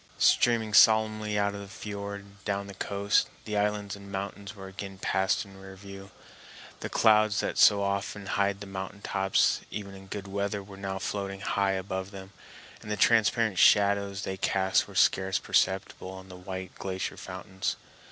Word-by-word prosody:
Steaming 115 -3 +3
solemnly 110 -1 +5
out 100 0 +1
of 100 - -6
the 100 - -9
fiord 100 0 -6
and 100 0 -19
down 100 -1 -2
the 100 - -9
coast, 100 +1 +1 0.2
the 105 - -3
islands 105 -1 0
and 100 0 -12
mountains 100 +1 -5
were 95 -1 -9
again 95 0 -8
passed 95 +2 0
in 100 -1 -15
review; 95 0 -11 0.7
the - - -5
clouds 110 -1 +4
that - - -1
so 100 -1 +6
often 100 +1 -2
hide 100 0 0
the - - -6
mountain 95 +1 -7
tops 95 -1 +2
even 100 -2 -6
in 95 0 -12
good 100 0 -6
weather 100 +1 -2
were 100 0 -12
now 95 0 -4
floating 100 0 -4
high 100 -1 +1
above 95 0 -3
them, 95 -1 -10 0.5
and 105 - -10
the 105 - -1
transparent 110 -2 +3
shadows 100 -1 +4
they 95 - -4
cast 95 0 +1
were - - -13
scarce 95 0 +3
perceptible 95 0 0
on 95 0 -10
the 90 - -9
white 95 0 -7
glacier 95 -1 -3
fountains. 95 0 -4
100 Hz, 170 wpm, -28 LUFS, 95-105 Hz, 0.7 s, so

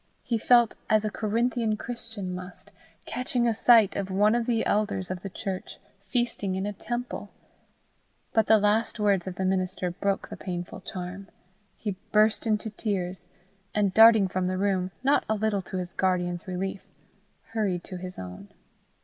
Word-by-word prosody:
He 230 -2 -1
felt 240 0 +5 0.2
as 215 0 +3
a 215 - -1
Corinthian 225 +1 0
Christian 225 -6 -5
must, 180 +1 -9 0.3
catching 250 -1 0
a 230 - +3
sight 225 -2 +5
of 195 -1 -2
one 205 +3 +3
of 240 0 0
the 230 -2 +1
elders 200 -3 0
of 180 -1 -4
the 195 - -5
church 190 0 -5 0.3
feasting 210 -3 -1
in 190 +1 -2
a 205 - -2
temple. 240 +5 -5 1.0
But 220 -2 +3
the 220 - +7
last 210 +2 +1
words 200 -3 +2
of 185 - -4
the 190 - -2
minister 185 -1 0
broke 195 +2 -1
the - - -7
painful 175 -2 -5
charm. 185 +1 -6 0.5
He 205 -4 -4
burst 215 +2 +3
into 215 0 0
tears, 185 -4 -3 0.5
and 205 -3 +2
darting 220 -2 +8
from 185 0 -1
the 185 0 -1
room, 190 -2 +1
not 275 +2 +3
a 220 - +2
little 210 -1 0
to 185 +1 -6
his 180 -1 -4
guardian's 180 -1 0
relief, 190 +1 -3 0.7
hurried 195 -6 0
to 185 - -7
his 180 0 -8
own. 90 +2 -8
200 Hz, 165 wpm, -27 LUFS, 185-220 Hz, 1.0 s, darting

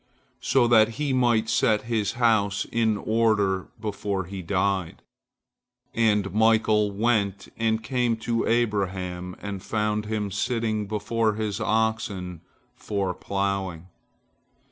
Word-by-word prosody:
so 125 -3 +3
that 110 -2 +5
he 145 -2 -1
might 120 -3 +2
set 110 -1 +2
his 110 -3 -1
house 110 -4 +2
in 110 -2 +1
order 105 -4 +1
before 100 -2 -3
he 95 +2 -7
died. 95 -1 -1 0.9
And 105 -3 +1
Michael 110 -1 +3
went 100 -2 0
and 110 -1 0
came 120 -1 0
to 115 -1 0
Abraham 95 -6 -1
and 100 -2 -5
found 105 0 -1
him 105 -2 -2
sitting 110 0 -1
before 110 +1 0
his 105 -1 -3
oxen 110 -6 -1 0.3
for 100 -3 -2
ploughing. 95 -3 -3
105 Hz, 115 wpm, -25 LUFS, 100-115 Hz, 0.9 s, that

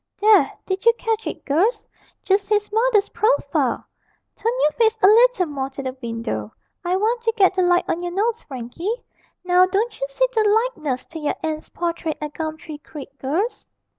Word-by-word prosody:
'There, 425 0 +5
did 380 0 -3
you 465 - +7
catch 450 -1 -2
it, - - -6
girls? 355 - +1 0.4
Just 395 +1 +1
his 415 -1 +1
mother's 445 -2 +2
profile! 470 +4 0 0.5
Turn 455 - -1
your 300 - +4
face 450 +4 +2
a - - +9
leetle 465 -2 +5
more 275 -4 -4
to 275 +1 -7
the 260 -1 -4
window; 230 - -4 0.3
I 355 +1 0
want 450 +5 0
to 455 -1 0
get 385 -2 +5
the 375 - +1
light 355 0 +3
on 340 - -1
your 350 0 -3
nose, 440 +5 0
Frankie; 290 - -5 0.4
now 360 0 +4
don't 415 +7 -1
you - - -2
see - - +1
the 445 -2 +3 0.3
likeness 280 - -4
to 325 - -9
your 295 - -1
aunt's 310 -1 -3
portrait 335 -2 -3
at 300 -1 -5
Gumtree 315 -1 -6
Creek, 285 -2 -11
girls?' 340 - -2
370 Hz, 185 wpm, -22 LUFS, 300-440 Hz, 0.5 s, a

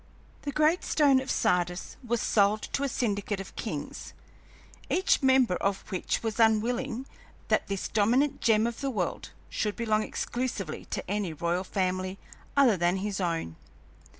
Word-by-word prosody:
The 285 - -3
Great 310 +4 +3
Stone 280 -4 +4
of 265 - -7
Sardis 180 -4 0
was 235 -2 -1
sold 210 0 +3
to - - 0
a 280 - 0
syndicate 205 -4 -1
of 195 - -8
kings, - - -5 0.8
each 370 -2 +3
member 260 -8 +4
of 195 0 -1
which 185 +4 -1
was 225 0 -3
unwilling 240 +3 +2 0.4
that - - +2
this 195 -1 -2
dominant 250 +7 +2
gem 220 -1 +4
of 235 +2 -3
the 275 - 0
world 195 -9 -2 0.2
should 210 -1 -2
belong 220 -2 +1
exclusively 220 -8 -3
to - - -5
any 200 -3 -1
royal 170 +4 -1
family 185 0 -1 0.4
other 250 -8 +5
than 175 +1 +2
his 200 0 -3
own. 165 - -2
215 Hz, 150 wpm, -28 LUFS, 190-250 Hz, 0.8 s, other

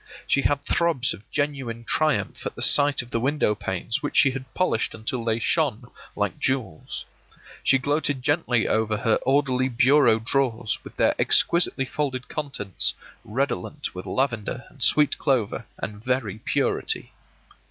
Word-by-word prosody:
She 140 - +2
had 145 0 0
throbs 165 -7 +2
of 100 - -14
genuine 135 -6 -2
triumph 155 +4 0
at - - -7
the - - -1
sight 145 -2 +4
of 120 - -16
the 115 - 0
window 135 -2 +1
panes 100 +2 -3
which 145 - -3
she 135 - +6
had 130 0 -7
polished 185 -11 0
until 115 +2 -3
they 115 -1 0
shone 125 0 0 0.2
like 105 -2 -2
jewels. 130 -12 -3 0.6
She 135 - +4
gloated 145 -1 -1
gently 125 -6 +1
over 110 -1 +1
her 110 0 +2
orderly 130 -1 +1
bureau 130 0 +4
drawers, 115 -2 0
with - - -12
their - - +3
exquisitely 170 -6 +3
folded 130 -2 -3
contents 125 - -1 0.3
redolent 125 -5 -3
with 90 - -8
lavender 130 -1 -2
and 140 - -19
sweet 150 +4 +3
clover 130 -8 0
and 105 +1 -6
very 120 -5 -1
purity. - - -1
130 Hz, 150 wpm, -24 LUFS, 110-140 Hz, 0.6 s, she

